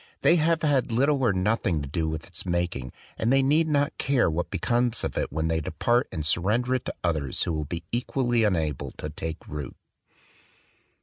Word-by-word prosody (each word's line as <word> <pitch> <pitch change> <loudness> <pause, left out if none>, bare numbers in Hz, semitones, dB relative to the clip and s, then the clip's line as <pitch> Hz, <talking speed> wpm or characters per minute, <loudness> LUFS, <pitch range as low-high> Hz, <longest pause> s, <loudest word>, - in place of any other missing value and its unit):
They 175 - +6
have 165 0 +2
had 140 -5 +2
little 135 +4 +2
or 120 -5 +4
nothing 95 -5 0
to - - -5
do 80 +2 -1
with 80 0 -4
its - - -7
making; 85 -8 -2 0.3
and 115 - +1
they 135 0 +4
need 155 +4 +3
not 145 0 0
care 135 -10 +2
what 85 +2 -2
becomes 120 -1 0
of - - -2
it, - - -1
when 80 +3 -1
they 80 0 0
depart 120 - +1
and 80 -1 -3
surrender 105 +11 +2
it 130 - -1
to - - -4
others 75 -6 0
who 85 - -1
will 75 -1 -2
be 85 +3 -5
equally 120 -1 +1
unable 80 -8 0
to 75 - -6
take 80 +1 -6
root. 75 -2 -6
100 Hz, 195 wpm, -26 LUFS, 80-130 Hz, 0.3 s, They